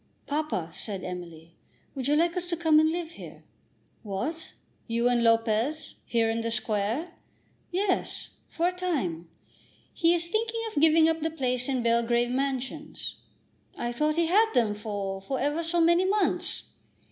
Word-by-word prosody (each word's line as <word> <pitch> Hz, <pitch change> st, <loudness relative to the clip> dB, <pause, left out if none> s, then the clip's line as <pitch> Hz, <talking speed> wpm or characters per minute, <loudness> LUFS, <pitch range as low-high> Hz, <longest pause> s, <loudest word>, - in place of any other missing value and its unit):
"Papa," 285 Hz, -, -2 dB
said 195 Hz, -4 st, -6 dB
Emily, 170 Hz, -2 st, -7 dB, 0.4 s
"would 265 Hz, -1 st, -3 dB
you 295 Hz, -, +3 dB
like 335 Hz, +2 st, +2 dB
us 360 Hz, -1 st, -2 dB
to 340 Hz, -1 st, -2 dB
come 320 Hz, -2 st, +5 dB
and 315 Hz, 0 st, +4 dB
live 335 Hz, -1 st, -3 dB
here?" -, -, -11 dB, 0.6 s
"What, 230 Hz, -, -4 dB, 0.3 s
you 235 Hz, +1 st, +1 dB
and 245 Hz, -1 st, +3 dB
Lopez; 230 Hz, +6 st, +1 dB
here, 230 Hz, -1 st, +2 dB
in 225 Hz, +1 st, 0 dB
the 230 Hz, -, -2 dB
Square?" 220 Hz, -, -1 dB, 0.6 s
"Yes; 375 Hz, +1 st, -1 dB, 0.2 s
for 335 Hz, +1 st, 0 dB
a -, -, -3 dB
time. 260 Hz, -, -2 dB, 0.6 s
He 335 Hz, 0 st, +3 dB
is 340 Hz, 0 st, -2 dB
thinking 450 Hz, +4 st, -1 dB
of 290 Hz, -, +1 dB
giving 320 Hz, 0 st, +6 dB
up 325 Hz, 0 st, +1 dB
the 320 Hz, -, 0 dB
place 255 Hz, -5 st, -1 dB
in 255 Hz, -3 st, 0 dB
Belgrave 235 Hz, +1 st, +2 dB
Mansions." 270 Hz, +3 st, -3 dB, 0.6 s
"I 240 Hz, -, -2 dB
thought 300 Hz, +5 st, +1 dB
he 335 Hz, 0 st, +2 dB
had 430 Hz, +7 st, +4 dB
them 225 Hz, -4 st, +3 dB
for 205 Hz, -2 st, -4 dB
for 265 Hz, +7 st, -3 dB
ever 295 Hz, +4 st, 0 dB
so 335 Hz, +1 st, 0 dB
many 340 Hz, +2 st, +4 dB
months." 405 Hz, +2 st, 0 dB
275 Hz, 160 wpm, -28 LUFS, 230-330 Hz, 0.6 s, giving